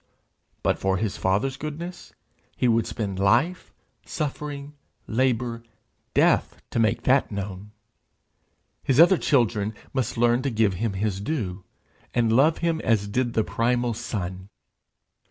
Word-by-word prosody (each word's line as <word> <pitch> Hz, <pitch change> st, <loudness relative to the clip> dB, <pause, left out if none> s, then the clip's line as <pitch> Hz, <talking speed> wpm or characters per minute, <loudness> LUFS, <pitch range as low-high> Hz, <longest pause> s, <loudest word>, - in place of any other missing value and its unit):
But -, -, +1 dB
for 95 Hz, 0 st, +1 dB
his 105 Hz, -1 st, -2 dB
Father's 105 Hz, +9 st, 0 dB
goodness, 165 Hz, +4 st, -7 dB, 0.5 s
he 125 Hz, -, +2 dB
would 115 Hz, -1 st, +2 dB
spend 100 Hz, -4 st, -4 dB
life, 120 Hz, -, +2 dB, 0.3 s
suffering, 145 Hz, -1 st, -5 dB, 0.3 s
labour, 120 Hz, -1 st, 0 dB, 0.5 s
death, -, -, +3 dB
to -, -, -1 dB
make 110 Hz, -1 st, +1 dB
that 130 Hz, -1 st, +3 dB
known! 100 Hz, 0 st, -5 dB, 1.1 s
His 135 Hz, +1 st, +1 dB
other 175 Hz, +2 st, +7 dB
children 110 Hz, -6 st, +1 dB, 0.2 s
must 130 Hz, -2 st, -1 dB
learn 120 Hz, +1 st, +3 dB
to 135 Hz, -, -1 dB
give 110 Hz, -4 st, +2 dB
him 105 Hz, +3 st, -2 dB
his 100 Hz, 0 st, -2 dB
due, 100 Hz, -, -3 dB, 0.5 s
and 115 Hz, -2 st, +2 dB
love 150 Hz, +6 st, +4 dB
him 165 Hz, -1 st, 0 dB
as 110 Hz, -3 st, +2 dB
did 120 Hz, +3 st, -1 dB
the 110 Hz, -, +2 dB
primal 120 Hz, +1 st, 0 dB
Son! 95 Hz, -3 st, -5 dB
115 Hz, 135 wpm, -25 LUFS, 100-135 Hz, 1.1 s, other